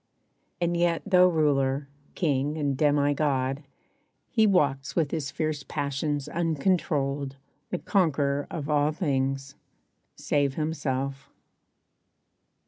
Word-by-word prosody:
And 175 Hz, -1 st, 0 dB
yet 170 Hz, -1 st, +1 dB
though 180 Hz, -2 st, +6 dB
ruler, 140 Hz, -4 st, +1 dB, 0.3 s
king 145 Hz, -2 st, 0 dB
and 145 Hz, -3 st, 0 dB
demi 145 Hz, 0 st, +3 dB
god 135 Hz, -2 st, 0 dB, 0.7 s
He 220 Hz, -2 st, +4 dB
walks 140 Hz, -8 st, +1 dB
with 160 Hz, -5 st, +1 dB
his 150 Hz, -4 st, -2 dB
fierce 155 Hz, 0 st, -2 dB
passions 145 Hz, +1 st, -2 dB
uncontrolled 150 Hz, -4 st, 0 dB, 0.3 s
The -, -, -1 dB
conquerer 145 Hz, -5 st, +1 dB
of 165 Hz, -7 st, -5 dB
all 150 Hz, 0 st, +2 dB
things 135 Hz, -3 st, -1 dB, 0.6 s
save 140 Hz, -2 st, 0 dB
himself. 140 Hz, -3 st, -2 dB
145 Hz, 105 wpm, -27 LUFS, 140-160 Hz, 0.7 s, though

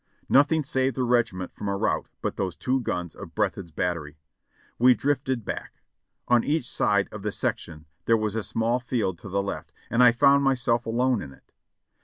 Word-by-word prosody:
Nothing 145 Hz, +3 st, +4 dB
saved 130 Hz, -2 st, 0 dB
the 130 Hz, -, 0 dB
regiment 120 Hz, -7 st, 0 dB
from 105 Hz, -, -6 dB
a 100 Hz, 0 st, -1 dB
rout -, -, 0 dB, 0.2 s
but -, -, -2 dB
those 95 Hz, -3 st, -2 dB
two 130 Hz, +1 st, 0 dB
guns 90 Hz, -8 st, -3 dB
of -, -, -11 dB
Breathed's 90 Hz, -3 st, -1 dB
battery. 80 Hz, -2 st, -3 dB, 0.6 s
We 125 Hz, +1 st, +6 dB
drifted 130 Hz, -5 st, -1 dB
back. -, -, -6 dB, 0.4 s
On 120 Hz, -1 st, +4 dB
each 145 Hz, -4 st, 0 dB
side 100 Hz, -1 st, +1 dB
of 105 Hz, -, -8 dB
the 105 Hz, +1 st, -2 dB
sec -, -, -1 dB
tion 80 Hz, -1 st, -12 dB, 0.2 s
there 115 Hz, -, +4 dB
was 110 Hz, -2 st, -2 dB
a 110 Hz, -, -1 dB
small 115 Hz, +3 st, 0 dB
field 115 Hz, -8 st, -2 dB
to -, -, -9 dB
the 100 Hz, +1 st, 0 dB
left, 100 Hz, -, -5 dB, 0.2 s
and 115 Hz, -, +3 dB
I 125 Hz, -1 st, +8 dB
found 140 Hz, +4 st, +5 dB
myself 125 Hz, -3 st, +1 dB
alone 120 Hz, 0 st, +1 dB
in 70 Hz, -, -8 dB
it. -, -, -24 dB
115 Hz, 195 wpm, -26 LUFS, 100-130 Hz, 0.6 s, I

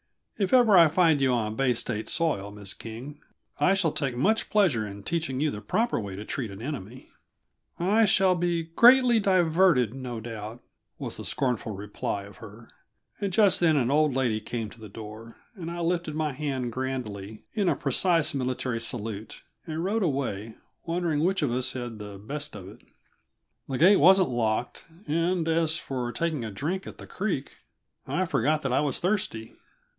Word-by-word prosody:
"If 195 Hz, -2 st, 0 dB
ever 240 Hz, -5 st, +6 dB
I 170 Hz, -3 st, +8 dB
find 160 Hz, -2 st, +3 dB
you 135 Hz, -1 st, +3 dB
on 110 Hz, -3 st, -1 dB
Bay 130 Hz, 0 st, +2 dB
State 110 Hz, -1 st, -2 dB
soil, 145 Hz, -, 0 dB
Miss 100 Hz, -2 st, -5 dB
King, 125 Hz, +7 st, -9 dB, 0.4 s
I 190 Hz, -, +4 dB
shall 180 Hz, -5 st, +1 dB
take 135 Hz, -5 st, -2 dB
much 215 Hz, -, +1 dB
pleasure 160 Hz, -, +2 dB
in 100 Hz, 0 st, -9 dB
teaching 160 Hz, -4 st, -2 dB
you 150 Hz, 0 st, +1 dB
the 105 Hz, -, -6 dB
proper 225 Hz, -, 0 dB
way 100 Hz, -3 st, -5 dB
to 105 Hz, +2 st, -7 dB
treat 120 Hz, -2 st, -3 dB
an 100 Hz, 0 st, -9 dB
enemy." 130 Hz, -3 st, -7 dB, 0.7 s
"I 210 Hz, +5 st, +3 dB
shall 190 Hz, -1 st, +4 dB
be 175 Hz, -1 st, 0 dB
greatly 240 Hz, +8 st, +6 dB
diverted, 175 Hz, -, +3 dB
no 125 Hz, -3 st, -5 dB
doubt," 110 Hz, 0 st, -7 dB, 0.3 s
was -, -, -5 dB
the -, -, -7 dB
scornful 120 Hz, -5 st, -1 dB
reply 100 Hz, 0 st, -4 dB
of 100 Hz, -1 st, -13 dB
her 110 Hz, +2 st, -12 dB, 0.5 s
and 200 Hz, -2 st, -2 dB
just 200 Hz, 0 st, +4 dB
then 165 Hz, -3 st, +4 dB
an 130 Hz, -3 st, +1 dB
old 150 Hz, -2 st, +3 dB
lady 120 Hz, -5 st, 0 dB
came 110 Hz, -1 st, -4 dB
to 115 Hz, -, -15 dB
the 110 Hz, -1 st, -10 dB
door, 110 Hz, +2 st, -10 dB, 0.2 s
and 175 Hz, -7 st, -7 dB
I 170 Hz, 0 st, -5 dB
lifted 170 Hz, -2 st, -1 dB
my 155 Hz, -1 st, 0 dB
hand 130 Hz, -3 st, -3 dB
grandly 110 Hz, -5 st, -5 dB
in 205 Hz, -5 st, +1 dB
a -, -, +2 dB
precise 165 Hz, +3 st, +2 dB
military 130 Hz, -3 st, -2 dB
salute 110 Hz, -2 st, -5 dB, 0.2 s
and 160 Hz, +1 st, -3 dB
rode 210 Hz, +4 st, 0 dB
away, 125 Hz, -, -2 dB, 0.3 s
wondering 165 Hz, -3 st, -1 dB
which 185 Hz, -1 st, +1 dB
of 140 Hz, -, +1 dB
us 125 Hz, +1 st, -1 dB
had 130 Hz, -, -4 dB
had 115 Hz, -3 st, -7 dB
the 105 Hz, -1 st, -8 dB
best 145 Hz, +7 st, -6 dB
of 95 Hz, -3 st, -9 dB
it. 105 Hz, +5 st, -13 dB, 0.9 s
The 135 Hz, -, -2 dB
gate 190 Hz, +7 st, +6 dB
wasn't 190 Hz, +3 st, +6 dB
locked, 120 Hz, 0 st, -1 dB, 0.2 s
and 165 Hz, +2 st, 0 dB
as 165 Hz, 0 st, +1 dB
for 125 Hz, -3 st, -4 dB
taking 155 Hz, +1 st, -2 dB
a 110 Hz, -, -4 dB
drink 160 Hz, -, -3 dB
at -, -, -9 dB
the -, -, -10 dB
creek, 185 Hz, -9 st, -3 dB, 0.5 s
I 185 Hz, -, 0 dB
forgot 150 Hz, 0 st, +1 dB
that 135 Hz, -2 st, -1 dB
I -, -, +3 dB
was 145 Hz, -3 st, -1 dB
thirsty. 175 Hz, -, -2 dB
135 Hz, 185 wpm, -27 LUFS, 115-170 Hz, 0.9 s, I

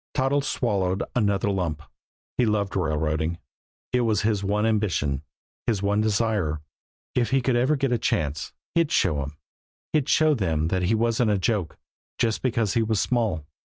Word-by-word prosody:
Toddles 135 Hz, +2 st, +1 dB
swallowed 95 Hz, -5 st, 0 dB
another 100 Hz, -3 st, +2 dB
lump. 85 Hz, -5 st, -2 dB, 0.6 s
He 125 Hz, -, +5 dB
loved 100 Hz, -2 st, 0 dB
railroading; 80 Hz, -1 st, 0 dB, 0.6 s
it 125 Hz, -, +3 dB
was 110 Hz, -3 st, +1 dB
his 105 Hz, -2 st, +1 dB
one 105 Hz, +2 st, +1 dB
ambition, 95 Hz, -11 st, 0 dB, 0.5 s
his 105 Hz, -4 st, 0 dB
one 100 Hz, +1 st, +2 dB
desire. 105 Hz, -7 st, +1 dB, 0.5 s
If 120 Hz, -2 st, +1 dB
he 135 Hz, -, +3 dB
could 125 Hz, -1 st, +1 dB
ever 130 Hz, +5 st, +3 dB
get 135 Hz, -2 st, 0 dB
a 120 Hz, -, +2 dB
chance, 75 Hz, -6 st, -1 dB, 0.2 s
he'd 170 Hz, -3 st, +2 dB
show 95 Hz, -, +3 dB
them! 70 Hz, +2 st, -4 dB, 0.6 s
He'd 150 Hz, -4 st, +1 dB
show 155 Hz, -1 st, +4 dB
them 80 Hz, -, 0 dB
that 95 Hz, +1 st, 0 dB
he 95 Hz, +5 st, +2 dB
wasn't 115 Hz, +1 st, +2 dB
a 105 Hz, -, +3 dB
joke, 95 Hz, -3 st, -1 dB, 0.4 s
just 115 Hz, -2 st, 0 dB
because 115 Hz, -5 st, +1 dB
he 115 Hz, -, +2 dB
was 110 Hz, -2 st, +1 dB
small! 110 Hz, -, 0 dB
105 Hz, 165 wpm, -25 LUFS, 90-120 Hz, 0.6 s, He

